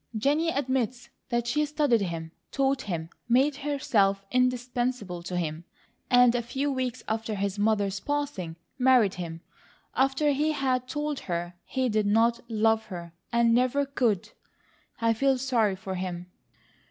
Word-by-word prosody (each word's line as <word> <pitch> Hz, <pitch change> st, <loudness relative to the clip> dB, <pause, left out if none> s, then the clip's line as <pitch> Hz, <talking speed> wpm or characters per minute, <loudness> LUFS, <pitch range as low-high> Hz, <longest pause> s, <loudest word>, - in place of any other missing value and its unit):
"Jennie 295 Hz, +8 st, +2 dB
admits 255 Hz, -4 st, -1 dB, 0.2 s
that 240 Hz, -1 st, 0 dB
she 300 Hz, +6 st, +1 dB
studied 295 Hz, -6 st, +2 dB
him, 165 Hz, -3 st, -4 dB, 0.2 s
taught 270 Hz, 0 st, +1 dB
him, 170 Hz, -6 st, -4 dB, 0.2 s
made 270 Hz, +4 st, +3 dB
herself 210 Hz, -9 st, +1 dB
indispensable 250 Hz, -6 st, 0 dB
to 180 Hz, +1 st, -4 dB
him, 160 Hz, -1 st, -3 dB, 0.5 s
and 245 Hz, -1 st, +6 dB
a 245 Hz, -, +1 dB
few 270 Hz, +4 st, -2 dB
weeks 255 Hz, -2 st, -2 dB
after 220 Hz, 0 st, -2 dB
his 200 Hz, 0 st, -2 dB
mother's 205 Hz, -2 st, +1 dB
passing, 285 Hz, -, -3 dB, 0.2 s
married 250 Hz, -6 st, +5 dB
him, 165 Hz, -2 st, -6 dB, 0.5 s
after 270 Hz, +3 st, +2 dB
he 300 Hz, +3 st, +1 dB
had 255 Hz, -3 st, 0 dB
told 295 Hz, +1 st, -2 dB
her 175 Hz, 0 st, -3 dB
he 260 Hz, -1 st, 0 dB
did 215 Hz, -2 st, +1 dB
not 230 Hz, +3 st, +3 dB
love 220 Hz, 0 st, +2 dB
her 170 Hz, -3 st, -7 dB, 0.2 s
and 235 Hz, -1 st, +4 dB
never 255 Hz, +4 st, +2 dB
could. 240 Hz, -8 st, 0 dB, 0.7 s
I 230 Hz, 0 st, +3 dB
feel 270 Hz, +3 st, +2 dB
sorry 240 Hz, -6 st, +1 dB
for 190 Hz, 0 st, -6 dB
him." 180 Hz, -1 st, -5 dB
235 Hz, 145 wpm, -27 LUFS, 195-265 Hz, 0.7 s, and